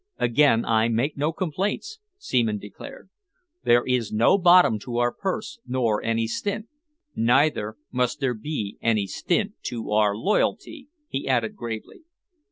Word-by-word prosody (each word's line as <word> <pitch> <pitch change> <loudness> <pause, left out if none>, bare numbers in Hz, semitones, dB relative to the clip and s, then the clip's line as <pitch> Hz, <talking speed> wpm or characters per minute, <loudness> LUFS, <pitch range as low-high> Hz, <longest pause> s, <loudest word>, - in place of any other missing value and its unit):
"Again 120 -1 +3
I 110 0 +2
make 120 +6 0
no 150 +3 0
complaints," 195 - -3 0.2
Seaman 115 - 0
declared. 105 - -11 0.5
"There 120 +1 +4
is 125 -4 0
no 115 - +4
bottom 175 - +6
to 120 +3 -5
our 120 0 +2
purse, 205 +7 -4
nor 120 -4 0
any 115 0 0
stint. 205 - -3 0.5
Neither 120 -2 +2
must 125 +2 0
there 135 -3 0
be 110 -3 -5
any 110 -3 +1
stint 200 - -1
to 115 -3 -4
our 105 -1 +3
loyalty," 245 - -1 0.2
he 135 - -4
added 120 -4 0
gravely. 115 - -7
120 Hz, 140 wpm, -24 LUFS, 115-165 Hz, 0.5 s, bottom